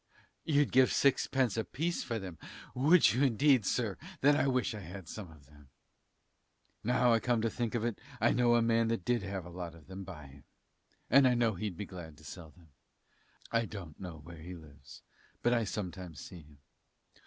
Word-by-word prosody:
You'd 145 -2 +2
give 130 0 +5
sixpence 130 -4 +2
a 110 - +1
piece 170 +9 -2
for 115 - -3
them, 95 -6 -7 0.3
would 150 +5 +5
you, 125 - 0
indeed, 130 -3 +4
sir; 110 -6 0 0.2
then 145 +2 +5
I 140 - +2
wish 125 -3 +1
I 105 - -6
had 90 -1 -9
some 100 -3 -7
of 75 -3 -17
them. 75 -1 -19 1.1
Now 125 +1 +3
I 115 - +4
come 120 0 +1
to 115 - +1
think 120 -2 -2
of 115 -1 0
it 120 -3 -2 0.2
I - - +4
know 120 0 +4
a 120 - +4
man 115 0 +3
that 115 -6 -2
did 120 -2 +1
have 95 -2 -5
a 90 - -10
lot 85 -1 -6
of 80 -2 -16
them 95 +1 -8
bye 85 -6 -9
him, 70 0 -15 0.7
and 140 -1 +7
I 125 - +3
know 115 -2 +2
he'd 95 -1 -4
be 105 - -4
glad 85 -6 -10
to - - -17
sell 80 -3 -9
them. 85 +1 -21 0.8
I 115 0 +2
don't 90 -8 -9
know 90 -4 -7
where 85 0 -11
he 90 +3 -8
lives, 70 -4 -14 0.4
but 120 - +3
I 115 -2 +2
sometimes 90 - -5
see 90 - -9
him. 75 -1 -19
105 Hz, 205 wpm, -32 LUFS, 85-120 Hz, 1.1 s, and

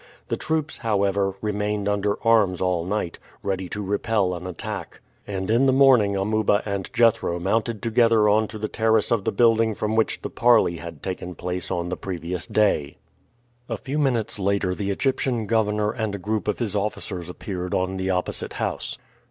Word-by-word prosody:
The - - +1
troops, 155 -1 -2
however, 100 -3 +1
remained 105 -1 -1
under 100 0 +1
arms 105 -6 +4
all 90 -2 0
night, 95 -2 -3 0.2
ready 95 -2 -2
to 105 - -4
repel 100 -1 0
an 90 +1 -6
attack, 90 -3 -6 0.3
and 95 -2 -3
in 120 +5 +3
the - - +5
morning 130 -7 +5
Amuba 105 +1 +1
and 100 -2 -3
Jethro 115 -7 +3
mounted 110 +4 -1
together 115 -2 +4
on 110 +1 +3
to 110 - -7
the 110 0 -2
terrace 110 -1 +1
of 115 -4 +1
the - - +1
building 115 0 +3
from 110 +2 -1
which 110 -1 +1
the - - -4
parley 115 -8 +4
had 85 +1 -9
taken 90 -1 -5
place 90 +2 -4
on 85 0 -2
the 90 - -3
previous 90 -1 -4
day. 100 -10 +1 0.7
A 115 - -2
few 135 +8 -3
minutes 120 -7 0
later 100 -1 +1
the 100 +1 -3
Egyptian 125 +1 0
governor 105 -1 +1
and 110 -4 -3
a - - -3
group 105 +3 -2
of 105 - 0
his 110 -4 -2
officers 100 -4 -3
appeared 90 0 -4
on 95 +1 -1
the 95 0 -2
opposite 90 -1 -2
house. - - -3
105 Hz, 180 wpm, -24 LUFS, 95-110 Hz, 0.7 s, the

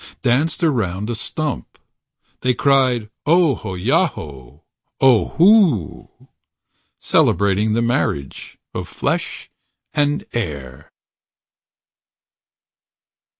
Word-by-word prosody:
Danced 145 +8 +1
around 110 - -1
a - - -2
stump. 120 - -5 0.6
They 125 -1 0
cried, 130 -5 +2 0.2
"Ohoyaho, 90 - 0 0.4
Ohoo"... 135 - +3 0.9
Celebrating 100 +2 +1
the 115 +1 +1
marriage 80 - -2 0.2
Of - - -5
flesh - - -3 0.4
and 145 0 0
air. 70 - -5
115 Hz, 65 wpm, -19 LUFS, 90-145 Hz, 0.9 s, Ohoo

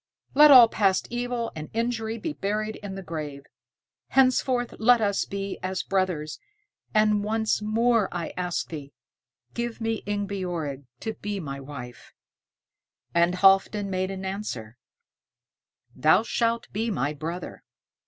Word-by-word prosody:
Let 300 +2 +8
all 250 -4 +10
past 195 -4 +1
evil 240 -1 -2
and 155 -1 -7
injury 230 -1 -1
be 300 +7 -4
buried 215 -1 -2
in 200 -2 -7
the 195 - -7
grave. 150 -4 -6 0.6
Henceforth 255 -2 +2
let 245 +2 +5
us 200 -2 +1
be 200 0 -5
as 185 0 -2
brothers, 180 -6 -1 0.5
and 215 -1 +3
once 220 0 0
more 225 0 +2
I 170 -2 -4
ask 180 -1 -2
thee, 145 -3 -8 0.6
give 235 -1 -3
me 225 -1 -2
Ingebjorg 180 -9 -3 0.2
to 220 - -3
be 205 -1 -4
my 140 -5 -5
wife." 135 -3 -10 1.0
And 170 +1 +3
Halfdan 195 +1 +4
made 185 0 -1
answer, 190 - -5 1.2
"Thou 170 +7 +4
shalt 230 0 0
be 225 +3 -1
my 150 -8 -1
brother." 165 +4 -6
200 Hz, 130 wpm, -26 LUFS, 170-225 Hz, 1.2 s, all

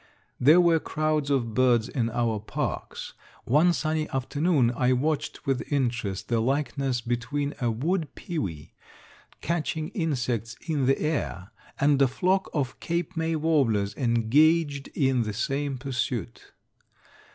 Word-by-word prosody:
There 150 +7 +6
were 170 -2 +4
crowds 155 -2 -1
of 120 -5 0
birds 120 -2 +3
in 120 -4 -1
our 115 -2 0
parks. 105 - -4 0.3
One 150 +8 +4
sunny 155 -2 -1
afternoon 135 0 +1
I 125 +2 +2
watched 145 +4 -2
with 135 +1 -2
interest 120 -8 -1
the 115 -1 +1
likeness 135 0 0
between 120 +5 -2
a 120 - +2
wood 155 +8 -1
pewee, 95 - -5 0.7
catching 160 -1 -2
insects 125 - -2
in 145 -5 0
the 135 - +3
air, 145 - -2 0.3
and 140 0 +3
a 135 - +6
flock 185 +9 0
of 135 -5 -2
Cape 170 +1 -2
May 160 0 0
warblers 125 -11 +1
engaged 140 +6 +2
in 130 -4 +2
the 110 -2 -2
same 135 +5 -2
pursuit. 125 -5 -4
135 Hz, 130 wpm, -26 LUFS, 120-155 Hz, 0.7 s, There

